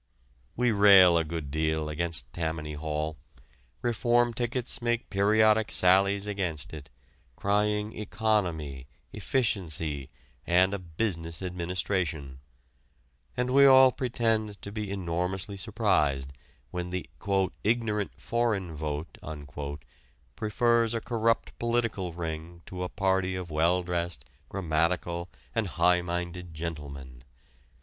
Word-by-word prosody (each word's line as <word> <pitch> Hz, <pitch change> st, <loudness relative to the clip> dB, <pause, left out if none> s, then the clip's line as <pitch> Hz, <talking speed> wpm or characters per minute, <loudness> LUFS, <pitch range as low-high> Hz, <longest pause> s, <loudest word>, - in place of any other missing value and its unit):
We 125 Hz, 0 st, +2 dB
rail 100 Hz, -4 st, +8 dB
a 85 Hz, -, +3 dB
good 80 Hz, -3 st, -5 dB
deal 80 Hz, 0 st, 0 dB
against 75 Hz, -5 st, -3 dB
Tammany 80 Hz, -2 st, -3 dB
Hall. 75 Hz, +1 st, -3 dB, 0.7 s
Reform 120 Hz, 0 st, +2 dB
tickets 120 Hz, +1 st, -2 dB
make 120 Hz, 0 st, -1 dB
periodic 110 Hz, +2 st, +4 dB
sallies 100 Hz, +2 st, +4 dB
against 95 Hz, -8 st, -2 dB
it, 75 Hz, -3 st, -9 dB, 0.5 s
crying 105 Hz, +3 st, +1 dB
economy, 90 Hz, -, -1 dB, 0.3 s
efficiency, 80 Hz, -, -1 dB, 0.4 s
and 90 Hz, +3 st, +4 dB
a 100 Hz, -, -2 dB
business 85 Hz, -1 st, -3 dB
administration. 85 Hz, -6 st, -2 dB, 1.0 s
And 125 Hz, +1 st, 0 dB
we 140 Hz, 0 st, +8 dB
all 130 Hz, -1 st, +8 dB
pretend 115 Hz, -5 st, -1 dB
to 100 Hz, -, -6 dB
be 105 Hz, -1 st, -4 dB
enormously 95 Hz, +2 st, -2 dB
surprised 70 Hz, -7 st, +1 dB, 0.4 s
when 90 Hz, 0 st, -3 dB
the 90 Hz, -3 st, -4 dB, 0.6 s
"ignorant 105 Hz, -2 st, 0 dB
foreign 110 Hz, -7 st, -1 dB
vote" 75 Hz, +1 st, -4 dB, 1.2 s
prefers 115 Hz, +1 st, +2 dB
a -, -, 0 dB
corrupt 115 Hz, 0 st, 0 dB
political 115 Hz, -6 st, 0 dB
ring 85 Hz, 0 st, -6 dB
to 90 Hz, -1 st, -7 dB
a 90 Hz, -, -2 dB
party 95 Hz, -1 st, 0 dB
of 90 Hz, -3 st, -5 dB
well 85 Hz, +4 st, +2 dB
dressed, 85 Hz, -1 st, -3 dB, 0.2 s
grammatical, 85 Hz, 0 st, -1 dB, 0.2 s
and 115 Hz, -3 st, 0 dB
high 90 Hz, 0 st, +3 dB
minded 90 Hz, -1 st, -4 dB
gentlemen. 70 Hz, -6 st, -6 dB
90 Hz, 110 wpm, -28 LUFS, 80-105 Hz, 1.2 s, rail